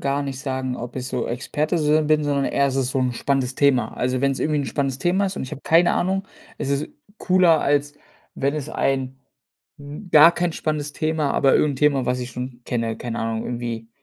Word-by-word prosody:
Gar 140 +1 0
nicht 135 -2 -5
sagen, 130 -2 -3
ob 120 +2 -7
ich 130 0 -4
so 125 -2 -2
Experte 150 +7 -2
sin 150 0 +2
bin, 155 -1 +2
sondern 140 -1 0
eher, 140 - +1
es 135 0 -2
ist 130 -1 +1
so 135 - -1
'n 125 -1 0
spannendes 130 0 -1
Thema. 130 -6 +2
Also, 125 0 -1
wenn's 135 -1 0
irgendwie 150 -1 +1
'n 135 - -3
spannendes 135 -2 -2
Thema 190 +3 +1
ist 190 - -5
und - - -3
ich 130 - -6
habe 145 - -6
keine 170 +2 +4
Ahnung, 190 +2 0 0.3
es 140 - -3
ist 140 +1 -1 0.3
cooler, 180 -3 +4
als 145 +1 +1 0.4
wenn 140 +2 -1
es 150 -1 -4
ein 135 -2 -1 0.6
'n 145 +7 -9
gar 155 +3 +8
kein 175 -1 -1
spannendes 150 -2 -3
Thema, 155 -2 -1
aber 135 - +3
irgend 145 -2 +2
'n - - -8
Thema, 140 -2 +2
was 125 0 0
ich 125 0 -5
schon 125 -1 -7
kenne 115 -2 -2
keine 120 -1 -5
Ahnung, 115 0 -2
irgendwie 120 -2 -5
140 Hz, 220 wpm, -22 LUFS, 125-150 Hz, 0.6 s, gar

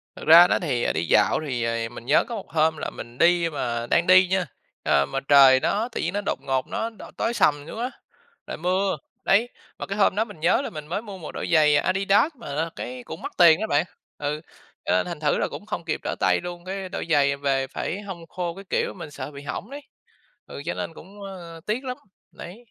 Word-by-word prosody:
Thật - - -10
ra 170 +2 +10
đó - - +2
thì, 130 -8 -1
ờ, - - +1
đi 80 - -1
dạo - - +4
thì 125 -5 -2
rồi 115 0 -1
mình 120 0 -11
nhớ 140 +4 +4
có 235 - -5
một 200 - -8
hôm 160 0 +2
là - - -4
mình 120 +1 -10
đi 170 +1 +4
mà 120 -6 -3
đang 170 - +2
đi 185 0 +7
nha, 190 0 +1 0.4
à, 70 - +3
mà 135 - -3
trời 135 -2 +8
nó 215 - 0
tự - - -3
nhiên - - -2
nó 205 - -1
đột - - -1
ngột 130 -1 -1
nó 225 - -2
đ 225 - -15 0.2
tối 230 - 0
sầm 145 -10 +2
xuống - - -7
á, 250 +2 -2 0.6
rồi - - -5
mưa, 185 +2 0 0.3
đấy. 220 +5 +3 0.3
Mà - - -4
cái 200 - -5
hôm 200 -2 +3
đó 220 - +1
mình 205 -8 -13
nhớ 170 +10 +3
là - - -4
mình 150 -2 -8
mới 185 +5 -2
mua 205 -4 -9
một 165 -4 -8
đôi - - -5
giày 150 -2 +5
Adidas 195 - +2
mà 185 -11 -7
là 160 +3 -1
cái 125 0 -6
cũng 160 - -9
mắc - - -5
tiền 170 0 +7
đó 220 - -1
bạn, 150 -1 +2 0.3
ừ, 150 +1 -3 0.4
cho - - 0
nên 90 - +2
thành 170 -3 -5
thử 150 -1 +1
là - - 0
cũng 205 - -9
không 170 - -4
kịp 160 - -2
trở - - -2
tay - - +3
luôn. 175 0 -7
Cái 190 0 -5
đôi 185 - -4
giày 140 -2 +4
về 135 -1 0
phải 185 +8 -4
hong 180 -5 -8
khô 175 0 -4
các 195 0 -11
kiểu, - - 0
mình 165 -5 -9
sợ 145 0 -7
bị 140 - -10
hỏng 195 +9 -5
đấy, 285 +1 -8 0.6
ừ, - - -8
cho - - -1
nên 165 - -5
cũng, 200 +5 -13
ơ, 175 -4 -9
tiếc 225 +5 -1
lắm, 255 -1 -4 0.3
đấy. 175 - -10
170 Hz, 250 wpm, -24 LUFS, 145-195 Hz, 0.6 s, ra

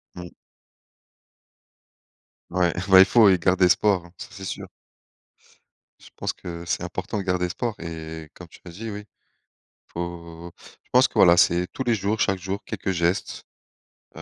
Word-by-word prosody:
Mmh. 90 -1 -9 2.2
Ouais, 90 -1 +1 0.2
beh, 95 -1 +8
il - - +10
faut 110 +1 +6
y 95 - +3
garder 90 +2 +2
espoir, 95 0 +2
hein, 85 - -16
ça - - -8
c'est 95 - -10
sûr. - - -6 1.3
Je - - -16
pense - - -3
que 85 -1 -8
c'est 85 - -2
important 105 - -4
de 100 - -2
garder 90 -1 0
espoir 115 +5 -3
et 80 -1 -8
comme 90 - -12
tu - - -17
l'as 85 - -10
dit, 110 +5 -7
oui, 105 0 -7 0.8
faut 85 0 -7 0.3
je - - -35
pense 125 +1 +5
que, - - -27
voilà, 85 -1 +6
c'est 85 +1 +3
tous 130 - -3
les 120 - +1
jours, 105 +1 -2
chaque 95 -1 +1
jour 95 +3 -5
quelques 95 - -3
gestes. 85 0 -1 0.7
Heu, - - -9
90 Hz, 170 wpm, -24 LUFS, 85-100 Hz, 2.2 s, il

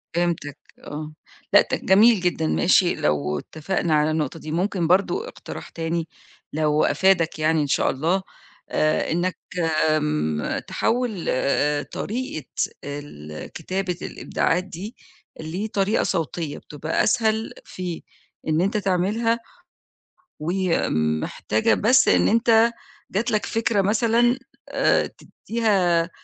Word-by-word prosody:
فِهِمتك 170 -4 -1 0.3
آه 155 +1 -7 0.4
لأ - - +9
ت - - -1
جميل 210 +3 +6
جدًا، 180 - 0
ماشي 80 -1 +3
لو 75 0 0
اتفقنا 160 - -2
على 150 +1 +2
النقطة 155 0 -2
دي، 155 - -7
ممكن 175 +1 0
برضه 200 - +2
إقتراح - - -9
تاني 165 0 -3 0.5
لو 150 0 +2
أفادك 180 -5 +2
يعني 155 0 +2
إن 145 - -1
شاء - - +2
الله 165 +8 0 0.5
آآ 155 0 +1
إنك 175 +2 0 0.6
م 150 - -1
تحوِّل 230 -7 -1
آآ 145 +3 +1
طريقة 215 - -5 0.4
ال 140 - -7
كتابة 185 +2 -3
الإبداعات 180 +2 -1
دي 195 +6 -8 0.4
لطريقة 195 +6 -1
صوتية، 165 -3 -2
بتبقى 150 +2 -2
أسهل 220 0 +1
في 180 -3 -6 0.5
إن 155 +1 +2
أنت 200 +5 +1
تعملها، 210 +4 +1 1.0
ومحتاجة 110 - 0
بس 255 +5 +4
إن - - +4
أنت 230 0 +4 0.4
جات 230 +5 0
لك 215 -2 0
فكرة 225 -2 +1
مثلًا 230 +4 +3 0.3
آآ - - +2 0.4
تديها 185 -7 +2
175 Hz, 115 wpm, -23 LUFS, 150-210 Hz, 1.0 s, لأ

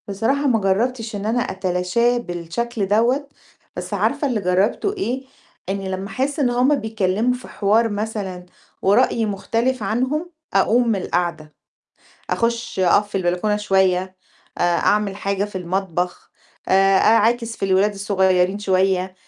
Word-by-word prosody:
بصراحة 225 +9 0
ما 235 -4 +3
جرَّبتش 220 +3 -1
إن 200 0 -5
أنا 230 +3 +1
أتلاشاه 190 +5 0
بالشكل 200 +2 -3
دوّة، 240 +8 +2 0.5
بس - - -6
عارفة 290 - 0
اللي 240 -5 -1
جرَّبته 195 - +1
إيه؟ 265 - -3 0.5
إني 195 0 -3
لمّا 190 +1 -4
أحس 275 +7 -2
إن 265 -4 +2
هُم 250 +4 +3
بيتكلموا 220 -1 0
في 250 0 -8
حوار 220 +3 +2
مثلًا 205 -4 -4 0.4
ورأيي 225 +3 +3
مختلف 230 +4 -1
عنهم، 260 - -1 0.2
أقوم 230 +5 +3
من 225 - +2
القعدة، 170 -4 -2 0.8
أخش 230 -1 -1
أقف 195 +3 +3
في - - -20
البلكونة 180 +3 0
شوية، 190 -2 +1 0.4
آآ، - - 0
أعمل 195 +3 +1
حاجة 200 0 -1
في 205 -2 -6
المطبخ، 180 -1 -3 0.4
آآ، 195 0 +4
أعاكس 230 +1 +3
في - - -3
الولاد 195 +2 +3
الصغيرين 190 -1 +1
شوية. 190 -2 +1
205 Hz, 135 wpm, -21 LUFS, 190-235 Hz, 0.8 s, آآ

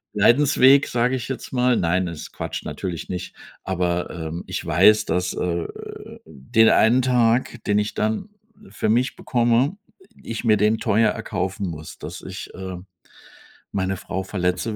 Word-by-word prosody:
Leidensweg, 135 +5 +5
sage 125 +2 +1
ich 125 - -4
jetzt 135 - -5
mal. 125 0 +3
Nein, 90 +1 +1
ist 80 -2 -7
Quatsch, - - -5
natürlich 90 -4 -5
nicht. 90 -1 -5 0.3
Aber, 90 -1 -1
ähm, 85 0 -5
ich - - -4
weiß, 110 0 +5
dass, 90 0 -1
äh, - - -3 0.2
äh - - -10
den 110 - +2
einen 120 +4 +4
Tag, 120 -1 +1
den 105 0 +2
ich 105 0 -2
dann 110 - -1 0.4
für - - -3
mich 125 +4 +1
bekomme 120 +8 +1 0.2
äh, - - -19 0.2
ich 115 - -5
mir 110 -2 +5
den 105 +2 +2
teuer 110 0 +3
erkaufen 95 0 -3
muss, 80 -1 -8
dass - - -8
ich, - - -8
äh, 95 -1 -6 0.9
meine 95 -1 -1
Frau 95 - -4
verletze, 95 +3 -2
105 Hz, 160 wpm, -22 LUFS, 90-120 Hz, 0.9 s, Leidensweg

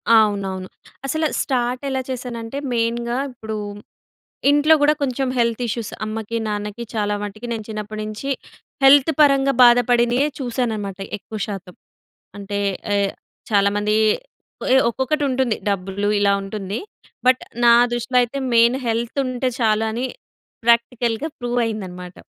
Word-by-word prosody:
అవునవును. 195 -3 +1 0.4
అసలు 315 +4 0
స్టార్ట్ 250 0 -1
ఎలా 265 -1 -1
చేశానంటే, 245 0 -5 0.2
మెయిన్‍గా 235 +1 0
ఇప్పుడు, 220 -3 -6 0.9
ఇంట్లో 295 +2 +5
కూడా 295 +1 +5
కొంచెం 265 0 -1
హెల్త్ 235 0 +1
ఇష్యూస్ 225 0 -3
అమ్మకి, 220 +1 -4
నాన్నకి 210 +2 -4
చాలా 205 -1 0
మట్టికి 215 +3 -6
నేను 220 -2 -5
చిన్నప్పటి 215 0 -5
నుంచి, 215 +6 -5 0.6
హెల్త్ 285 +3 +7
పరంగా 275 -1 +4
బాధపడినవే 245 +2 +4
చూశానన్నమాట, 225 -6 -2 0.2
ఎక్కువ 215 +2 -8
శాతం. 195 -3 -7 0.6
అంటే 200 0 -4 0.4
ఏ - - +3 0.5
చాలామంది 205 +1 +2 0.9
ఒక్కొక్కటి 265 +5 -1
ఉంటుంది, 255 -3 +1
డబ్బులు 195 +1 -1
ఇలా 200 -1 +3
ఉంటుంది. 195 +1 -4 0.5
బట్ 255 0 +4 0.2
నా 235 - +8 0.2
దృష్టిలో 240 +2 0
అయితే 245 +3 -2 0.2
మెయిన్ 235 +2 +5
హెల్త్ 230 +4 -1
ఉంటే 255 0 -1
చాలు 220 -1 +2
అని, 240 +4 -2 0.6
ప్రాక్టికల్‍గా 235 +3 +2
ప్రూవ్ 245 0 -1
అయిందన్నమాట. 180 -5 -6
230 Hz, 120 wpm, -21 LUFS, 210-250 Hz, 0.9 s, నా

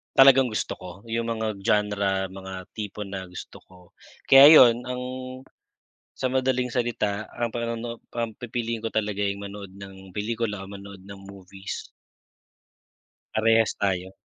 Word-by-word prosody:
talagang 135 -1 +7
gusto 110 - -2
ko, 90 - -10 0.2
yung 115 0 -2
mga 110 -1 -2
genre, 100 -1 +1
mga 95 0 -9 0.2
tipo 105 -1 -6
na 95 -2 -7
gusto 90 - -9
ko. 95 - -19 0.5
Kaya 135 +1 +9 0.2
yun 120 -1 +5
ang 125 0 -4 1.2
sa 130 - +1
madaling 130 -1 0
salita 110 -4 -1
ang 120 0 -2
panonoo 115 0 -4 0.2
ang 115 -2 -3
pipiliin 115 -1 -4
ko 115 - -3
talaga 105 -2 -1
yung 100 0 -2
manood 100 -1 -9
ng 95 -1 -12
pelikula 105 0 -3
o - - -12
manood 100 -1 -10
ng 100 +1 -11
movies. 95 0 -8 1.4
Parehas 115 0 +3
tayo. 95 -2 -1
105 Hz, 140 wpm, -25 LUFS, 100-115 Hz, 1.4 s, Kaya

